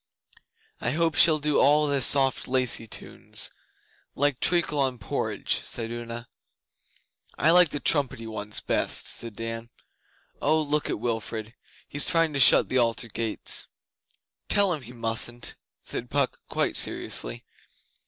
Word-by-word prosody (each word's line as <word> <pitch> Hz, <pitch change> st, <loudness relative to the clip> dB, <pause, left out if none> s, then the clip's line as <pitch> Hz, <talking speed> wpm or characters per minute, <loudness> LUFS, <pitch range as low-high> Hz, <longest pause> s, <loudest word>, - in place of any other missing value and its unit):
'I 120 Hz, -, -1 dB
hope 165 Hz, 0 st, +1 dB
she'll 160 Hz, +1 st, +6 dB
do 150 Hz, -1 st, 0 dB
all 150 Hz, +1 st, +4 dB
the 140 Hz, -2 st, 0 dB
soft 135 Hz, 0 st, +3 dB
lacey 125 Hz, -3 st, +1 dB
tunes -, -, -3 dB, 0.6 s
like 145 Hz, -1 st, 0 dB
treacle 170 Hz, -4 st, +2 dB
on 130 Hz, -2 st, 0 dB
porridge,' 105 Hz, -, -2 dB
said 115 Hz, -1 st, -4 dB
Una. 120 Hz, 0 st, -6 dB, 1.1 s
'I 155 Hz, -, +4 dB
like 180 Hz, -1 st, +6 dB
the 145 Hz, -, -4 dB
trumpety 140 Hz, -6 st, +1 dB
ones 105 Hz, -1 st, -1 dB
best,' -, -, -1 dB
said 115 Hz, -3 st, -4 dB
Dan. 115 Hz, +1 st, -6 dB, 0.7 s
'Oh, 155 Hz, +2 st, +2 dB
look 150 Hz, 0 st, -1 dB
at -, -, -3 dB
Wilfrid! 115 Hz, -1 st, -4 dB, 0.3 s
He's 145 Hz, -, -2 dB
trying 165 Hz, -3 st, +1 dB
to 140 Hz, -, -2 dB
shut -, -, +7 dB
the 130 Hz, -, +1 dB
Altar 115 Hz, 0 st, 0 dB
gates!' 110 Hz, 0 st, -1 dB, 0.8 s
'Tell 200 Hz, -3 st, +4 dB
him 155 Hz, -, -5 dB
he 120 Hz, -1 st, -11 dB
mustn't,' 120 Hz, 0 st, -3 dB, 0.3 s
said 120 Hz, -, -5 dB
Puck, 140 Hz, -2 st, 0 dB
quite -, -, 0 dB
seriously. -, -, -1 dB
130 Hz, 140 wpm, -25 LUFS, 115-150 Hz, 1.1 s, shut